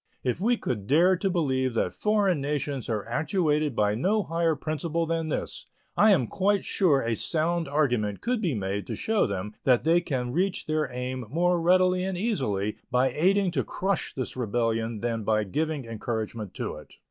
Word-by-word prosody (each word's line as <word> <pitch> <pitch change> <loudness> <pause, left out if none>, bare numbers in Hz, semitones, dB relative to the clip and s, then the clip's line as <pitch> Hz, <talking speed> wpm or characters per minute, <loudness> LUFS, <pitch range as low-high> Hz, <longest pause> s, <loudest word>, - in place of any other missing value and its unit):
If 125 +6 -1
we 240 +4 +2
could 105 - -4
dare 175 +8 +5
to 195 +2 0
believe 130 -8 0
that - - 0
foreign 205 -7 +1
nations 140 -3 -2
are 110 -3 -1
actuated 150 - 0
by 105 -1 +2
no 200 - +1
higher 165 -2 0
principle 155 +3 -2
than 165 -1 -1
this, - - -4 0.3
I 215 - +5
am 170 - +4
quite 195 - 0
sure 155 -9 +3
a 115 0 0
sound 165 +5 0
argument 125 -9 0
could 245 -2 -1
be 170 - 0
made 100 0 -3
to - - -3
show 220 -2 +1
them 100 +1 -4
that 125 -2 +3
they 165 +3 +4
can 125 -7 -2
reach 185 +6 0
their 155 -3 0
aim 125 0 -4
more 175 +4 +1
readily 180 +1 +3
and 190 -1 -2
easily 120 - -1
by 125 +2 +3
aiding 190 +3 +2
to - - 0
crush 195 0 -2
this 130 -2 -4
rebellion 115 -2 -1
than 115 -2 -2
by 110 0 +2
giving 150 - -2
encouragement 110 -2 -4
to - - -4
it. - - -14
150 Hz, 180 wpm, -27 LUFS, 115-175 Hz, 0.3 s, dare